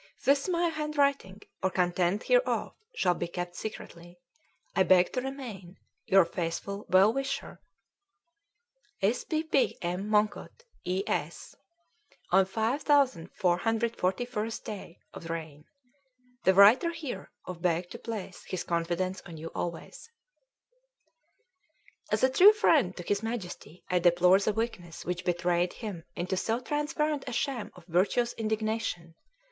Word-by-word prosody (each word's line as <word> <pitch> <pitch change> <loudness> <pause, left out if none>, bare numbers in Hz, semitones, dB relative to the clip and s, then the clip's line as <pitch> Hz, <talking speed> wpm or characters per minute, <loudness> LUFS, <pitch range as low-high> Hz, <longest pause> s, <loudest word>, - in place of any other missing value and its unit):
"This 280 +5 +3
my 345 -1 +2
handwriting 285 -10 0 0.2
or 190 - +2
content 180 +2 +1
hereof - - +1 0.2
shall 180 - +2
be 170 - -4
kept 175 0 -5
secretly. 175 -4 -8 0.6
"I - - +3
beg 185 -1 +4
to 255 - 0
remain 235 -9 -7 0.3
"Your 190 -2 +6
faithful 175 +4 -4
& - - -34
well 195 +4 +5
wisher 275 -8 -4 1.4
"S. 215 +5 +2
P. 315 -1 -1
P. 300 -4 +1
M. 180 +4 -3
MONGKUT 215 - 0 0.2
E. 185 +2 0
S. - - -3 0.8
"on 190 +1 +5
5441th 225 - 0
day 195 -5 -8 0.2
of 165 - -9
reign. 160 -3 -6 0.8
"the 190 - +5
writer 215 - +7
here 300 - -6 0.2
of 180 -2 -7
beg 175 +1 0
to 235 - -8
place 215 -6 -6
his 185 - -4
confidence 175 +2 -1
on 165 -2 -9
you 160 +1 -7
alway." 170 -1 -4 2.2
As - - +1
a 260 - +6
true 385 +10 +8
friend 300 - +3
to 175 - -6
his 200 +3 0
Majesty, 210 -6 -6
I 180 - +2
deplore 175 +2 +5
the 200 - +1
weakness 205 -7 -4
which 180 +1 -3
betrayed 175 0 0
him 195 -8 -7
into 185 +2 -2
so 225 +5 0
transparent 295 +1 -1
a - - -3
sham 245 -1 -2
of 180 -2 -15
virtuous 195 +7 +1
indignation. 215 -6 -2
195 Hz, 130 wpm, -29 LUFS, 175-245 Hz, 2.2 s, true